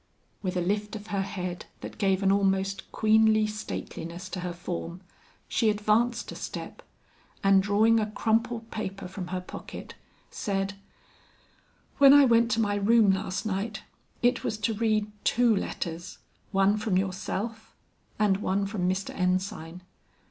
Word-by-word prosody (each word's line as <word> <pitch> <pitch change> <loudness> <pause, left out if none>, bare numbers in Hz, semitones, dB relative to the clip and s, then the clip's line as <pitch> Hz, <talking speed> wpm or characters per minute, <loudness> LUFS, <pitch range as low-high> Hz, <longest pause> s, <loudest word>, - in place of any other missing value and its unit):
With 185 -2 -2
a - - +1
lift 205 +4 -1
of 210 -1 -7
her 195 - +1
head 180 -2 -5
that - - -8
gave 195 -2 +2
an 195 - +4
almost 195 0 0
queenly 220 0 +4
stateliness 185 -4 -6
to 185 - -5
her 180 0 -3
form, 175 0 -5 0.5
she 225 - +2
advanced 215 +3 +1
a - - -7
step, - - -7 0.6
and 195 -1 +6
drawing 215 +3 +4
a 215 -1 -1
crumpled 225 +1 0
paper 195 -3 -5
from 185 -1 -6
her 185 +1 -3
pocket, 180 - -9 0.4
said, 195 -1 -2 1.3
"When 280 0 +9
I 285 -1 +8
went 235 -1 +4
to 225 - 0
my 205 -2 +1
room 210 0 +5
last 190 +1 -2
night, 210 +1 -3 0.4
it 245 +1 +3
was 215 - -2
to 220 +1 0
read 215 -1 0
two 240 -2 +3
letters, 170 -2 -4 0.3
one 195 +1 +3
from 210 -3 0
yourself, 195 +4 -3 0.4
and 205 -3 +3
one 195 0 0
from 195 -3 -1
Mr. 190 +1 -2
Ensign. 180 -2 -2
200 Hz, 150 wpm, -27 LUFS, 190-220 Hz, 1.3 s, When